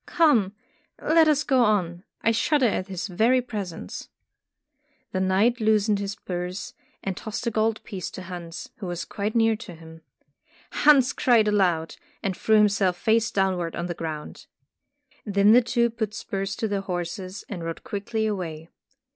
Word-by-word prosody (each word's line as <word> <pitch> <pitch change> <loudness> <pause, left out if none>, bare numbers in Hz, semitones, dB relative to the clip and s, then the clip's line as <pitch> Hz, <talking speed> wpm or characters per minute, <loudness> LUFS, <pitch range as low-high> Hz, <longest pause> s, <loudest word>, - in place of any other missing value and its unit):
Come, 235 - +3 0.4
let 320 0 +4
us 300 -1 +3
go 265 -4 +3
on, 180 -5 0 0.2
I 230 - +4
shudder 265 +4 +2
at 200 -4 0
his 185 -3 -4
very 225 +7 +3
presence.'' 200 - -6 1.0
The 185 - -1
knight 195 +6 +2
loosened 215 -1 +2
his 200 0 -3
purse, 180 -2 -5 0.3
and 190 -1 -2
tossed 215 +4 -5
a 235 - 0
gold 220 0 0
piece 190 -3 -5
to 185 - -7
Hans, 175 -2 -7
who 190 - -6
was 175 -1 -4
quite 210 +2 -3
near 225 -1 +4
to 180 -5 -10
him. 160 0 -13 0.7
Hans 280 -3 +5
cried 230 -4 +3
aloud, 180 -6 +1 0.3
and 195 -3 -1
threw 220 - +2
himself 200 -4 +3
face 225 +2 +2
downward 185 -4 0
on 170 - -3
the 175 - -3
ground. 160 -3 -7 0.8
Then 200 0 +4
the 245 +2 +7
two 235 0 +1
put 220 -2 -3
spurs 195 -1 -3
to 220 - -2
their 200 -1 -1
horses 185 +1 -5
and 180 -5 -6
rode 165 0 -5
quickly 220 +2 -3
away. 170 -6 -4
200 Hz, 165 wpm, -25 LUFS, 180-225 Hz, 1.0 s, the